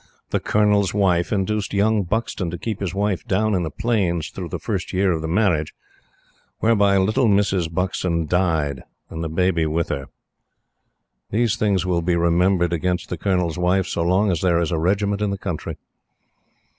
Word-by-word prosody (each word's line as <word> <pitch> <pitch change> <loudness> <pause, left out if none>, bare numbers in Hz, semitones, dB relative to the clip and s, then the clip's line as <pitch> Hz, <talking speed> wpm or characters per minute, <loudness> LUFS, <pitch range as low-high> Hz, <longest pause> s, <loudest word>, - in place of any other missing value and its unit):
The - - +1
Colonel's 105 -2 +2
Wife 90 -4 +2
induced 105 0 -1
young 105 +1 +3
Buxton 95 -1 -2
to 90 - -5
keep 110 +3 -4
his 95 -2 -3
wife 100 -5 -1
down 110 +3 +1
in 90 - +1
the 80 - -2
Plains 90 -6 -1
through 90 -3 -6
the - - -3
first 100 -5 -4
year 95 0 +2
of 80 -2 -1
the 80 - -3
marriage. 85 -4 +1 0.8
Whereby 100 -3 +3
little 110 +6 +2
Mrs. 100 -5 +1
Buxton 90 -2 -1
died, 80 -5 0 0.3
and 80 0 -5
the 80 - -3
baby 85 -1 +1
with 80 +1 -1
her. 70 -1 -3 1.2
These 115 0 +1
things 100 -5 +1
will 90 -2 +1
be 85 +1 +1
remembered 85 +1 +2
against 90 +1 -1
the 90 - -2
Colonel's 90 -3 0
Wife 90 +1 +2
so - - -3
long 95 +4 +2
as 85 - -1
there 85 -2 +2
is 85 0 -1
a 80 - 0
regiment 100 +4 0
in 105 - +1
the 100 - -2
country. 90 -5 -5
90 Hz, 180 wpm, -22 LUFS, 85-100 Hz, 1.2 s, young